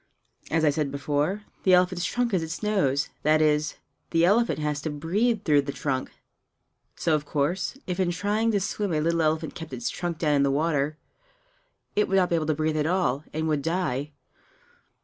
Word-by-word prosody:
As 160 Hz, 0 st, +2 dB
I 150 Hz, -, +5 dB
said 150 Hz, -1 st, -1 dB
before, 145 Hz, +8 st, -1 dB, 0.2 s
the 185 Hz, -1 st, +5 dB
elephant's 180 Hz, 0 st, +2 dB
trunk 245 Hz, 0 st, -1 dB
is 185 Hz, -, +2 dB
its 160 Hz, +5 st, -5 dB
nose 150 Hz, -10 st, +1 dB
that 155 Hz, +1 st, +3 dB
is, 150 Hz, 0 st, +2 dB, 0.3 s
the 165 Hz, 0 st, +3 dB
elephant 230 Hz, +6 st, +3 dB
has 150 Hz, -1 st, -2 dB
to 155 Hz, -, -3 dB
breathe 195 Hz, +10 st, 0 dB
through 150 Hz, -5 st, +4 dB
the 140 Hz, 0 st, -4 dB
trunk. 135 Hz, -2 st, -2 dB, 0.9 s
So 165 Hz, -, 0 dB
of 150 Hz, -1 st, 0 dB
course, 165 Hz, -, -1 dB
if 180 Hz, 0 st, -3 dB
in 185 Hz, -2 st, +2 dB
trying 205 Hz, +6 st, 0 dB
to 205 Hz, -, +3 dB
swim 200 Hz, -1 st, -2 dB
a 155 Hz, -, +1 dB
little 165 Hz, +2 st, +1 dB
elephant 160 Hz, 0 st, 0 dB
kept 165 Hz, -1 st, -8 dB
its 240 Hz, -, -3 dB
trunk 175 Hz, -2 st, -3 dB
down 155 Hz, -3 st, +1 dB
in -, -, +3 dB
the 140 Hz, -, +3 dB
water, 150 Hz, 0 st, 0 dB, 1.0 s
it 210 Hz, -, +2 dB
would 195 Hz, -, 0 dB
not 180 Hz, -2 st, +3 dB
be -, -, +4 dB
able 155 Hz, -2 st, -1 dB
to 155 Hz, -, +1 dB
breathe 155 Hz, +1 st, 0 dB
at 150 Hz, 0 st, +1 dB
all, 165 Hz, -6 st, 0 dB
and 160 Hz, +1 st, -2 dB
would 150 Hz, -2 st, +1 dB
die. 150 Hz, -4 st, -2 dB
160 Hz, 200 wpm, -26 LUFS, 150-185 Hz, 1.0 s, I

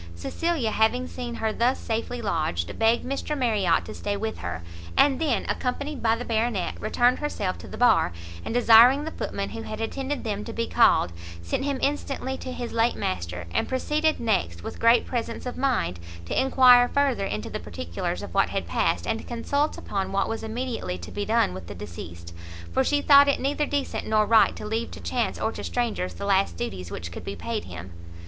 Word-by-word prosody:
Cecilia, 270 Hz, -, -1 dB
having 245 Hz, +4 st, +2 dB
seen 240 Hz, -2 st, -6 dB
her 220 Hz, -1 st, -1 dB
thus 245 Hz, +4 st, +2 dB
safely 230 Hz, +1 st, -3 dB
lodged, 155 Hz, -, -1 dB
begged 225 Hz, +1 st, +3 dB
Mr 275 Hz, +3 st, -3 dB
Marriot 210 Hz, -9 st, +2 dB
to -, -, -7 dB
stay 205 Hz, 0 st, -3 dB
with 220 Hz, +2 st, -4 dB
her, 85 Hz, -1 st, -5 dB, 0.3 s
and 280 Hz, 0 st, +4 dB
then, 295 Hz, -7 st, +1 dB
accompanied 280 Hz, +3 st, -2 dB
by 225 Hz, 0 st, +3 dB
the 245 Hz, +2 st, -6 dB
Baronet, 225 Hz, -4 st, 0 dB
returned 245 Hz, +3 st, +2 dB
herself 205 Hz, -11 st, -2 dB
to -, -, -10 dB
the -, -, -8 dB
bar, 245 Hz, -, +4 dB, 0.3 s
and -, -, -4 dB
desiring 245 Hz, +4 st, +7 dB
the 320 Hz, -, -4 dB
footman 200 Hz, -9 st, -4 dB
who 225 Hz, -, -6 dB
had 215 Hz, -1 st, -6 dB
attended 265 Hz, +5 st, -3 dB
them 210 Hz, -3 st, -3 dB
to -, -, -7 dB
be 230 Hz, -, -1 dB
called, 160 Hz, -, +4 dB, 0.3 s
sent 85 Hz, -, -2 dB
him 280 Hz, -1 st, 0 dB
instantly 275 Hz, -2 st, -1 dB
to 260 Hz, -, -7 dB
his 245 Hz, -2 st, -5 dB
late 230 Hz, +1 st, +2 dB
master, 90 Hz, -1 st, -3 dB
and -, -, 0 dB
proceeded 300 Hz, +4 st, +1 dB
next 180 Hz, -, -1 dB
with -, -, -7 dB
great 230 Hz, +1 st, +5 dB
presence 235 Hz, -1 st, -4 dB
of 250 Hz, -, -4 dB
mind, 255 Hz, -, 0 dB, 0.3 s
to 85 Hz, -, +1 dB
inquire 250 Hz, -2 st, +6 dB
further 275 Hz, -8 st, +1 dB
into 105 Hz, 0 st, -4 dB
the -, -, -3 dB
particulars 85 Hz, 0 st, -4 dB
of -, -, -8 dB
what -, -, +3 dB
had -, -, -2 dB
passed, 85 Hz, 0 st, 0 dB
and 225 Hz, -, -1 dB
to -, -, -9 dB
consult 280 Hz, +5 st, -1 dB
upon 195 Hz, -1 st, -3 dB
what 195 Hz, 0 st, +1 dB
was 225 Hz, -, -3 dB
immediately 230 Hz, -, -3 dB
to 85 Hz, -, -9 dB
be 205 Hz, 0 st, -3 dB
done 220 Hz, -, +2 dB
with 90 Hz, -2 st, -8 dB
the -, -, -7 dB
deceased; 85 Hz, -2 st, -9 dB, 0.4 s
for 265 Hz, -, +2 dB
she 290 Hz, +2 st, +1 dB
thought 280 Hz, -1 st, +8 dB
it 280 Hz, -, +2 dB
neither 290 Hz, +2 st, 0 dB
decent 285 Hz, -1 st, -2 dB
nor 215 Hz, -1 st, +3 dB
right 225 Hz, 0 st, +5 dB
to -, -, -7 dB
leave 225 Hz, +2 st, -2 dB
to -, -, -10 dB
chance -, -, -2 dB
or -, -, 0 dB
to -, -, -7 dB
strangers 230 Hz, -7 st, -2 dB
the 200 Hz, -, -5 dB
last 195 Hz, -1 st, +2 dB
duties 90 Hz, -, -4 dB
which 85 Hz, -3 st, -6 dB
could -, -, -8 dB
be -, -, -5 dB
paid -, -, -4 dB
him. 90 Hz, 0 st, -9 dB
230 Hz, 205 wpm, -25 LUFS, 190-260 Hz, 0.4 s, thought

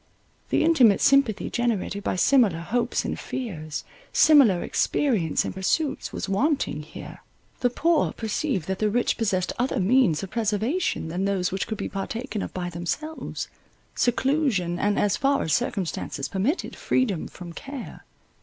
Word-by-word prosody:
The -, -, +2 dB
intimate 260 Hz, -11 st, +5 dB
sympathy 275 Hz, -7 st, +3 dB
generated 225 Hz, -4 st, -1 dB
by -, -, -1 dB
similar 215 Hz, -3 st, +4 dB
hopes 235 Hz, +9 st, -1 dB
and -, -, -3 dB
fears, 160 Hz, -, -5 dB, 0.3 s
similar 260 Hz, -, +6 dB
experience 215 Hz, -, +1 dB
and -, -, -4 dB
pursuits, 270 Hz, -, -1 dB
was -, -, -4 dB
wanting 245 Hz, -, 0 dB
here. 155 Hz, +1 st, -10 dB, 0.4 s
The 245 Hz, -, +2 dB
poor 330 Hz, +6 st, +2 dB
perceived 220 Hz, -, -2 dB
that 190 Hz, 0 st, -2 dB
the 215 Hz, -, +2 dB
rich 240 Hz, +3 st, +1 dB
possessed 185 Hz, -5 st, 0 dB
other 250 Hz, -2 st, 0 dB
means 195 Hz, -, +3 dB
of 190 Hz, -, -7 dB
preservation 225 Hz, -, -1 dB
than 180 Hz, +4 st, -2 dB
those 195 Hz, -2 st, 0 dB
which 190 Hz, 0 st, -2 dB
could 220 Hz, -, -4 dB
be -, -, -3 dB
partaken 220 Hz, +3 st, -4 dB
of -, -, -5 dB
by 175 Hz, -1 st, -4 dB
themselves, 295 Hz, -, -4 dB, 0.5 s
seclusion, 245 Hz, -, +1 dB
and, 205 Hz, 0 st, +1 dB
as 205 Hz, 0 st, +2 dB
far 275 Hz, 0 st, +2 dB
as 160 Hz, -, 0 dB
circumstances 180 Hz, -, -2 dB
permitted, 205 Hz, -, -1 dB
freedom 210 Hz, -10 st, 0 dB
from 175 Hz, -2 st, -10 dB
care. 275 Hz, +5 st, -8 dB
215 Hz, 150 wpm, -25 LUFS, 185-265 Hz, 0.5 s, similar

